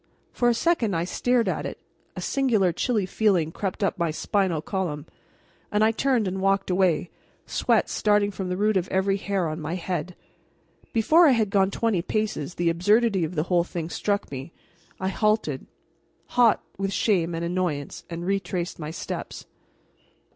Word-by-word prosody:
For 240 - +2
a 235 - +2
second 235 - +1
I 165 - 0
stared 240 +6 +1
at - - -1
it; - - -7 0.4
a - - -5
singular 220 -10 +2
chilly 215 0 0
feeling 185 -5 +1
crept 195 +3 -3
up 195 - 0
my 170 -1 +1
spinal 175 +2 0
column, 155 -3 -3 0.7
and 210 +1 +2
I 220 - +5
turned 245 -2 +1
and 190 +1 -3
walked 195 0 +1
away, 180 -3 +2 0.3
sweat - - +1
starting 205 -1 +2
from 190 -2 -5
the 180 - -2
root 210 0 +2
of 185 -1 -1
every 195 +1 +1
hair 195 -3 -1
on 155 +1 -4
my 155 +3 -3
head. 180 -1 -3 0.8
Before 315 +10 +5
I 275 - +6
had 220 -4 +1
gone 195 -1 +3
twenty 205 -3 0
paces 205 -5 -2
the 170 -1 +1
absurdity 205 +3 +3
of 165 +3 -3
the 155 - +1
whole 175 0 +2
thing 170 -1 -5
struck 205 -6 -1
me. 135 +3 -6 0.5
I 190 - -1
halted, 210 -10 0 0.6
hot 240 -3 +4 0.2
with 195 0 -1
shame 175 -3 +1
and 165 +1 -2
annoyance, 170 -5 -2
and 170 0 -5
retraced 190 -3 -2
my 150 -1 -5
steps. 160 - -6
190 Hz, 170 wpm, -25 LUFS, 170-215 Hz, 0.8 s, I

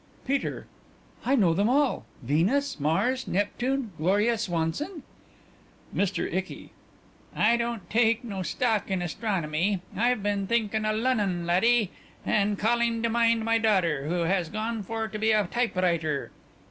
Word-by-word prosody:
PETER: 275 +1 -2 0.6
I 270 - +2
know 190 -10 +4
them 200 +6 +2
all: 280 +1 +1 0.2
Venus, 180 - +1
Mars, 200 - 0
Neptune, 240 +5 -1
Gloria 205 +8 +2
Swanson. 210 - -2 0.9
MR. 200 0 -1
ICKY: 185 +1 -4 0.6
I 225 +2 +4
don't 235 -5 -3
take 225 +2 +2
no 200 -5 -5
stock 215 +6 0
in 190 -2 -1
astronomy.... 180 -1 -1 0.2
I've 235 +1 +1
been 200 -1 -1
thinking 220 -1 0
o' - - +2
Lunnon, 210 -7 0
laddie. 210 +4 +3 0.3
And 205 0 +1
calling 230 +1 +1
to 230 - +2
mind 230 -1 +2
my 230 0 +3
daughter, 175 -10 +1
who 175 +2 0
has 170 0 0
gone 220 +2 -3
for 225 +3 -3
to 215 - -6
be 220 +1 +3
a 210 -1 +3
typewriter.... 175 - 0
215 Hz, 140 wpm, -27 LUFS, 180-235 Hz, 0.9 s, know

